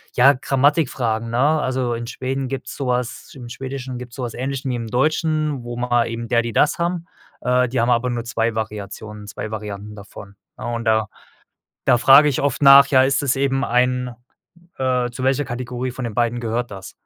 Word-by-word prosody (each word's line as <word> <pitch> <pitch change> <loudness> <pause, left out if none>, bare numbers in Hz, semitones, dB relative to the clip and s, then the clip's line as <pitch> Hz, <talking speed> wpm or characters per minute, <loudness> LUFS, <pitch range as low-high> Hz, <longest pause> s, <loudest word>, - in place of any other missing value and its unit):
ja, 135 +3 +6
Grammatikfragen, 130 -4 0
ne? 115 - -2
Also, 130 -4 +1
in 115 0 -5
Schweden 130 +2 -3
gibt's 135 0 -6
so 135 -3 -4
was 125 -1 -2
im 120 -3 -9
Schwedischen 130 0 -6
gibt's 125 -1 -10
so 130 - -5
was 120 -2 -4
Ähnliches, 135 +1 -4
wie 130 - -1
im 115 -1 -4
Deutschen, 155 +2 0
wo 120 0 -6
man 120 -1 +1
eben 115 0 -5
der, 120 -1 +3
die, 115 -1 -5
das 150 - +2
haben. 170 0 -1 0.4
Äh, 125 +1 +2
die 125 - -1
haben 120 +2 +2
aber 120 +1 +1
nur 120 -1 -2
2 115 -1 -1
Variationen. 105 -1 -6
2 110 +2 -6
Varianten 105 -1 -6
davon, 100 0 -12 0.2
ne, - - -7
und 115 -1 -3
da 110 -1 +2 0.8
da 125 - +5
frage 135 +4 +7
ich 130 - -1
oft 140 0 -1
nach: 140 0 +9
„Ja, 130 -2 +4
ist 135 +1 +2
das 140 -1 0
eben 135 0 0
ein, 125 0 +1 0.6
äh 125 -2 0
zu 120 +2 -7
welcher 135 +2 +2
Kategorie 125 0 -4
von 130 -1 -6
den 115 -3 -4
beiden 120 0 0
gehört 120 +1 -2
das?“ 95 -1 -9
125 Hz, 200 wpm, -21 LUFS, 115-135 Hz, 0.8 s, nach